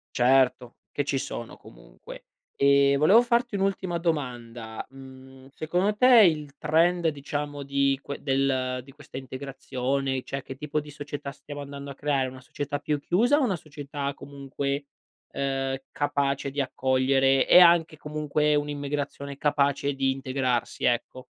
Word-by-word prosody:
Certo, 125 Hz, -1 st, +3 dB, 0.2 s
che 145 Hz, -, -1 dB
ci 140 Hz, -1 st, -1 dB
sono 120 Hz, -3 st, -6 dB
comunque. -, -, -14 dB, 0.3 s
Ehm, 140 Hz, 0 st, +4 dB
volevo 190 Hz, +11 st, +6 dB
farti 240 Hz, -2 st, 0 dB
un'ultima 190 Hz, -3 st, -1 dB
domanda, 120 Hz, -8 st, -3 dB
mhmm, 130 Hz, 0 st, -14 dB
secondo 180 Hz, +7 st, 0 dB
te 230 Hz, -, +3 dB, 0.2 s
il 150 Hz, -4 st, 0 dB
trend 165 Hz, +3 st, +2 dB
diciamo 145 Hz, 0 st, -5 dB
di 140 Hz, -1 st, +1 dB
que 140 Hz, -, -7 dB
del 135 Hz, -2 st, 0 dB
di 135 Hz, -, -15 dB
questa 150 Hz, 0 st, -11 dB
integrazione, 130 Hz, 0 st, -3 dB
cioè 135 Hz, -, -5 dB
che 135 Hz, -, -9 dB
tipo 150 Hz, +2 st, -2 dB
di 150 Hz, 0 st, -9 dB
società 145 Hz, -1 st, -6 dB
stiamo 145 Hz, +1 st, -9 dB
andando 140 Hz, 0 st, -8 dB
a -, -, -9 dB
creare: 140 Hz, -2 st, 0 dB
una 130 Hz, 0 st, -12 dB
società 145 Hz, +2 st, -4 dB
più 150 Hz, 0 st, -1 dB
chiusa 230 Hz, -, +2 dB
o -, -, +2 dB
una 210 Hz, -7 st, +1 dB
società 145 Hz, -3 st, -5 dB
comunque, 140 Hz, 0 st, -4 dB, 0.5 s
ehm, 135 Hz, -1 st, -1 dB
capace 140 Hz, -1 st, -1 dB
di 140 Hz, +2 st, -5 dB
accogliere 135 Hz, 0 st, +2 dB
e -, -, +8 dB
anche 170 Hz, -2 st, +5 dB
comunque 150 Hz, 0 st, 0 dB
un'immigrazione 145 Hz, -1 st, -3 dB
capace 140 Hz, -1 st, +1 dB
di 135 Hz, 0 st, +1 dB
integrarsi, 130 Hz, -2 st, -2 dB
ecco? 125 Hz, +1 st, -1 dB
140 Hz, 145 wpm, -26 LUFS, 135-150 Hz, 0.5 s, e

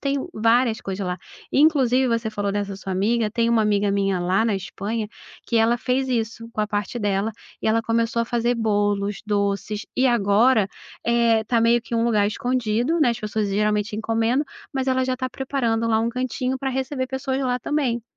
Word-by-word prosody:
tem 280 Hz, 0 st, 0 dB, 0.2 s
várias 230 Hz, +1 st, +2 dB
coisas 195 Hz, 0 st, -4 dB
lá, 180 Hz, 0 st, -2 dB, 0.4 s
inclusive 265 Hz, -4 st, +4 dB
você 230 Hz, -1 st, 0 dB
falou 205 Hz, -2 st, -2 dB
dessa 200 Hz, -1 st, -2 dB
sua 195 Hz, 0 st, -7 dB
amiga, 215 Hz, +3 st, +1 dB
tem 230 Hz, +1 st, +1 dB
uma 230 Hz, -2 st, +3 dB
amiga 205 Hz, -1 st, +2 dB
minha 195 Hz, -2 st, +1 dB
lá 185 Hz, +5 st, +1 dB
na 225 Hz, -3 st, +1 dB
Espanha 210 Hz, +3 st, -4 dB, 0.4 s
que 235 Hz, -, 0 dB
ela 225 Hz, +1 st, +4 dB
fez 260 Hz, +1 st, 0 dB
isso 230 Hz, -1 st, -2 dB
com 215 Hz, -, -2 dB
a 210 Hz, -, +1 dB
parte 205 Hz, +3 st, -3 dB
dela, 205 Hz, +1 st, 0 dB, 0.3 s
e -, -, +1 dB
ela 225 Hz, +1 st, +3 dB
começou 230 Hz, +1 st, 0 dB
a -, -, -2 dB
fazer 240 Hz, +1 st, 0 dB
bolos, 205 Hz, -2 st, 0 dB
doces 205 Hz, 0 st, -1 dB
e 260 Hz, -, +3 dB
agora, 220 Hz, -1 st, +3 dB, 0.4 s
eh, 235 Hz, -2 st, +3 dB
tá 230 Hz, +1 st, +1 dB
meio 235 Hz, +1 st, +4 dB
que 235 Hz, -, -14 dB
um 230 Hz, 0 st, +2 dB
lugar 215 Hz, -3 st, +3 dB
escondido, 245 Hz, +6 st, 0 dB
né, 250 Hz, -6 st, +4 dB
as 235 Hz, -, -3 dB
pessoas 215 Hz, -1 st, -1 dB
geralmente 210 Hz, +1 st, 0 dB
encomendam, 225 Hz, +5 st, +1 dB, 0.3 s
mas 265 Hz, -1 st, -2 dB
ela 260 Hz, 0 st, +2 dB
já 255 Hz, 0 st, -1 dB
tá 255 Hz, 0 st, -3 dB
preparando 245 Hz, -4 st, -1 dB
lá 220 Hz, -1 st, +3 dB
um 230 Hz, -, 0 dB
cantinho 255 Hz, +1 st, -2 dB
para 270 Hz, 0 st, -2 dB
receber 260 Hz, 0 st, -2 dB
pessoas 265 Hz, +1 st, -2 dB
lá 250 Hz, -2 st, 0 dB
também. 250 Hz, -3 st, -1 dB
230 Hz, 195 wpm, -23 LUFS, 210-250 Hz, 0.4 s, inclusive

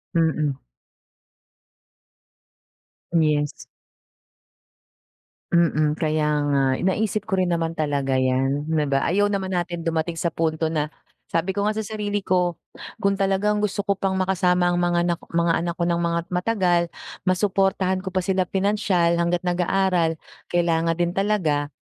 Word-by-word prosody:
Mm. 160 Hz, -3 st, +2 dB, 2.6 s
Yes. 150 Hz, -3 st, +2 dB, 2.0 s
Mm 155 Hz, -2 st, +2 dB
kaya 155 Hz, -1 st, +1 dB, 0.2 s
nga. 140 Hz, -1 st, +2 dB, 0.2 s
Naisip 210 Hz, +2 st, 0 dB
ko 200 Hz, -, 0 dB
rin 185 Hz, -2 st, +1 dB
naman 165 Hz, -1 st, -1 dB
talaga 140 Hz, -4 st, 0 dB
iyan, 135 Hz, +3 st, 0 dB
hindi 150 Hz, -2 st, +1 dB
ba? 135 Hz, 0 st, +1 dB
Ayaw 205 Hz, +4 st, +2 dB
naman 195 Hz, -2 st, -2 dB
natin 175 Hz, -1 st, -2 dB
dumating 165 Hz, 0 st, -1 dB
sa 165 Hz, 0 st, -1 dB
punto 160 Hz, 0 st, -1 dB
na, 150 Hz, -2 st, 0 dB, 0.4 s
sabi 165 Hz, +3 st, 0 dB
ko 200 Hz, +2 st, -1 dB
nga 215 Hz, -, 0 dB
sa 220 Hz, -, -2 dB
sarili 205 Hz, -1 st, -3 dB
ko 180 Hz, -2 st, +1 dB, 0.5 s
kung 200 Hz, 0 st, +2 dB
talagang 195 Hz, +2 st, +1 dB
gusto 205 Hz, -1 st, -1 dB
ko 200 Hz, -1 st, -1 dB
pang 190 Hz, -1 st, 0 dB
makasama 180 Hz, -1 st, +2 dB
ang 175 Hz, -, 0 dB
mga 175 Hz, -1 st, +2 dB
nak 170 Hz, -, -2 dB
mga 170 Hz, 0 st, +1 dB
anak 170 Hz, 0 st, -3 dB
ko 175 Hz, -, -2 dB
ng 170 Hz, 0 st, +1 dB
mga 170 Hz, 0 st, 0 dB
matagal, 180 Hz, -2 st, +2 dB, 0.5 s
masuportahan 190 Hz, 0 st, +1 dB
ko 190 Hz, 0 st, -7 dB
pa 185 Hz, -, +1 dB
sila 185 Hz, -1 st, 0 dB
pinansiyal 190 Hz, -4 st, +1 dB
hangga't 170 Hz, +1 st, 0 dB
nag-aaral, 180 Hz, -1 st, +1 dB, 0.3 s
kailangan 165 Hz, -1 st, +1 dB
din 175 Hz, 0 st, 0 dB
talaga 180 Hz, -7 st, 0 dB
175 Hz, 140 wpm, -23 LUFS, 165-190 Hz, 2.6 s, Mm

